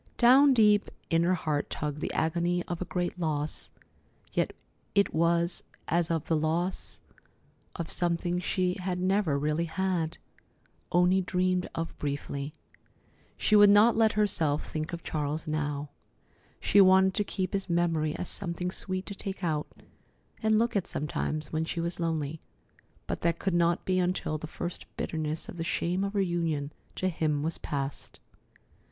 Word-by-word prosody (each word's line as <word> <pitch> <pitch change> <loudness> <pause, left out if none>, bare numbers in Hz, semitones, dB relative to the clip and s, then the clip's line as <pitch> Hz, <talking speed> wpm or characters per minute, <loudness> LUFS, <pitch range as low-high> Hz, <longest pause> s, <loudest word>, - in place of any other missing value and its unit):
Down 265 +3 +7
deep 210 -3 +4 0.2
in 165 0 +4
her 180 +2 +3
heart 155 -4 -1
tugged 150 0 -3
the - - -2
agony 170 +2 0
of 175 -1 -5
a - - -1
great 175 +2 -2
loss, 155 -3 -1 0.6
yet - - +1 0.4
it 200 0 +3
was 170 +2 +1 0.2
as 170 0 +1
of 165 -2 -1
the 165 - +2
loss 165 +4 -1 0.8
of 170 -2 -4
something 175 0 0
she 180 0 0
had 180 -1 -2
never 185 -5 +2
really 150 +3 0
had—only 180 +1 -1
dreamed 185 0 0
of 165 0 -3
briefly. 140 0 -3 0.9
She 215 - +3
would 205 -1 +8
not 210 +3 +6
let 220 -1 +4
herself 165 -8 +1
think 155 0 -4
of 170 -1 -6
Charles 150 0 -2
now. 150 -2 -2 0.7
She 200 - +5
wanted 190 0 +6
to 205 - +1
keep 190 -2 -3
his 195 -1 -2
memory 165 -3 +1
as 180 - -4
something 180 -2 -3
sweet 185 0 -4
to 200 - -6
take 195 -1 -6
out 155 -3 0 0.7
and 220 -1 +3
look 230 +1 +1
at 195 - 0
sometimes 150 +1 -3
when 155 0 +1
she 165 +1 -3
was 170 +1 -3
lonely, 160 -2 -2 0.6
but - - -4
that 170 0 +1
could 190 0 -1
not 170 0 +2
be 185 -1 +2
until 180 -4 -1
the 155 - -6
first 175 +2 -5
bitterness 155 -1 -2
of - - -8
the 165 - -2
shame 175 +3 0
of 200 +1 -2
her 200 - +2
union 165 -5 -1 0.2
to 185 - 0
him 155 -4 0
was 160 +1 -2
past. 140 -1 -4
170 Hz, 160 wpm, -29 LUFS, 155-185 Hz, 0.9 s, would